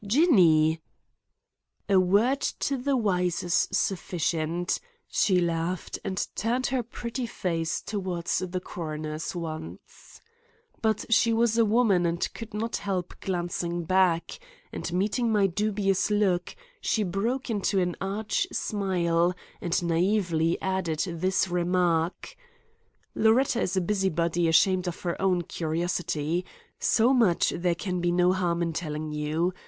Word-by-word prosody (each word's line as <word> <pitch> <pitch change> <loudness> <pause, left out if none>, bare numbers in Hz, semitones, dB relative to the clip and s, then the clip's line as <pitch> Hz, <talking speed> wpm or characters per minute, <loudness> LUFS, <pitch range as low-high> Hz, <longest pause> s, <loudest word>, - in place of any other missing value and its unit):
"Jinny!" 180 - +4 1.1
"A 195 -2 +5
word 205 +9 +3
to 275 - -1
the 270 +1 0
wise 180 -6 0
is 175 -1 +2
sufficient;" 175 -2 -1 0.3
she 185 -3 +2
laughed 170 +1 -2
and 190 - -2
turned 240 +4 -1
her 260 - +2
pretty 235 +1 -5
face 165 -7 -2
toward 185 -5 -4
the 185 0 -1
coroner's 155 -2 -5
once. 160 -2 -8 0.6
But 220 -2 0
she 230 +1 +4
was 230 0 +2
a 230 -1 +4
woman 210 -5 +3
and 170 +1 -2
could 225 -1 -8
not 225 +2 -2
help 185 -3 -3
glancing 175 -1 -2
back, 180 -1 +1 0.3
and, - - -4
meeting 215 +6 0
my 205 -2 +3
dubious 195 +1 0
look, 195 -4 +1 0.3
she 220 - +1
broke 230 +8 -2
into 200 -2 +1
an 180 -1 0
arch 200 +3 -1
smile 180 -4 0 0.3
and 175 0 0
naively 170 -1 +1
added 190 -5 -1
this 185 +3 0
remark: 175 -1 0 0.8
"Loretta 235 +2 +3
is 190 - -1
a - - +3
busybody 175 -3 0
ashamed 185 +3 +3
of 175 - -5
her 175 0 -3
own 185 -2 +2
curiosity. 165 0 -2 0.4
So 235 +3 +3
much 220 -10 +3
there 175 0 0
can 180 +1 -3
be 175 0 +1
no 180 +1 +3
harm 175 -2 0
in 165 -1 -2
telling 155 -1 -4
you. 155 +4 -1
180 Hz, 130 wpm, -27 LUFS, 170-210 Hz, 1.1 s, A